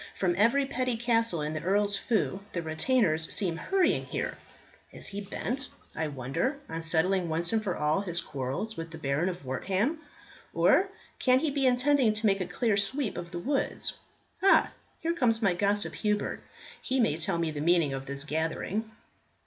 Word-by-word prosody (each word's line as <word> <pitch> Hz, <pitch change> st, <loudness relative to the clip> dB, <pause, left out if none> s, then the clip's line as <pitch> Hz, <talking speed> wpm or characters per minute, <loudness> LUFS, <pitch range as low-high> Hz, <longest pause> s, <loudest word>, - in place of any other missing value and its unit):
From 180 Hz, -2 st, +1 dB
every 235 Hz, +8 st, +3 dB
petty 255 Hz, -2 st, -1 dB
castle 230 Hz, -8 st, +1 dB
in 150 Hz, +1 st, -2 dB
the 155 Hz, -, -3 dB
Earl's 200 Hz, +2 st, +2 dB
feu 205 Hz, -3 st, 0 dB
the 170 Hz, -, -2 dB
retainers 160 Hz, 0 st, +1 dB
seem 180 Hz, -6 st, +1 dB
hurrying 380 Hz, -, +1 dB
here. -, -, -3 dB, 0.6 s
Is -, -, -6 dB
he 200 Hz, +1 st, -2 dB
bent, 245 Hz, +7 st, -3 dB, 0.3 s
I 160 Hz, -, -1 dB
wonder, 140 Hz, -, -2 dB
on 165 Hz, 0 st, -5 dB
settling 170 Hz, +2 st, +2 dB
once 170 Hz, +5 st, 0 dB
and 220 Hz, -1 st, +1 dB
for 190 Hz, -4 st, -2 dB
all 150 Hz, +5 st, +1 dB
his 175 Hz, -4 st, -1 dB
quarrels 140 Hz, -, -4 dB
with 165 Hz, 0 st, -6 dB
the 160 Hz, -, -9 dB
Baron 150 Hz, +4 st, 0 dB
of 175 Hz, -6 st, -7 dB
Wortham? 195 Hz, -, -1 dB, 0.6 s
or 390 Hz, -, +4 dB, 0.3 s
can 255 Hz, -1 st, +4 dB
he 295 Hz, +2 st, 0 dB
be 275 Hz, -1 st, +2 dB
intending 250 Hz, -2 st, +4 dB
to 215 Hz, +1 st, 0 dB
make 195 Hz, -2 st, +3 dB
a 180 Hz, -, -2 dB
clear 210 Hz, +3 st, 0 dB
sweep 215 Hz, +4 st, -1 dB
of 175 Hz, -1 st, -6 dB
the 175 Hz, -, -6 dB
woods? 270 Hz, +11 st, 0 dB, 0.5 s
Ah! 390 Hz, -, +5 dB, 0.3 s
here 335 Hz, +1 st, 0 dB
comes 235 Hz, -8 st, +2 dB
my 200 Hz, -5 st, +2 dB
gossip 205 Hz, +3 st, +1 dB
Hubert; 210 Hz, -1 st, -1 dB, 0.4 s
he 260 Hz, +1 st, -1 dB
may 220 Hz, -11 st, +3 dB
tell 165 Hz, +1 st, 0 dB
me 165 Hz, -1 st, 0 dB
the 145 Hz, -1 st, -4 dB
meaning 165 Hz, -3 st, +3 dB
of 135 Hz, 0 st, -5 dB
this 140 Hz, +1 st, -4 dB
gathering." 160 Hz, +8 st, -2 dB
195 Hz, 180 wpm, -29 LUFS, 160-235 Hz, 0.6 s, Ah